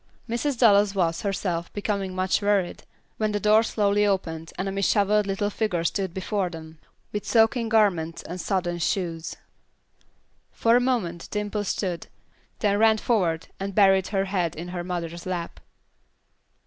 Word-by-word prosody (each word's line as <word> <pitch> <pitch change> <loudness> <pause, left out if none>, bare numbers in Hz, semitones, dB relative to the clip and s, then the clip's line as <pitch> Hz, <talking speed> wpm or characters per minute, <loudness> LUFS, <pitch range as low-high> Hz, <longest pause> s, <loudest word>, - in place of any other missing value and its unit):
Mrs. 245 +4 -1
Dallas 205 -4 +5
was, 170 -3 +1
herself, 185 -4 -2
becoming 200 -2 -2
much 185 +2 +1
worried, 200 -3 0 0.3
when 215 -1 0
the 205 - 0
door 215 +2 +5
slowly 205 -2 +1
opened 165 -5 -1
and 190 - -2
a - - -2
disheveled 200 +1 +2
little 205 +1 -1
figure 200 -6 -1
stood 190 +2 -1
before 190 +1 -2
them, 160 -2 -10 0.3
with 210 - -3
soaking 225 0 +3
garments 185 -7 +2
and 180 0 -6
sodden 175 -3 -1
shoes. 170 -1 -2 1.2
For 230 0 +3
a - - +6
moment 205 -10 -1
Dimple 210 0 -2
stood, 180 -3 -2 0.5
then 205 -1 +2
ran 220 0 +5
forward 180 -8 0
and 195 0 -4
buried 195 -2 +5
her 195 -1 0
head 180 -4 -1
in 170 +3 -6
her 175 -1 -4
mother's 175 -1 -5
lap. 175 -2 -4
195 Hz, 150 wpm, -25 LUFS, 175-210 Hz, 1.2 s, a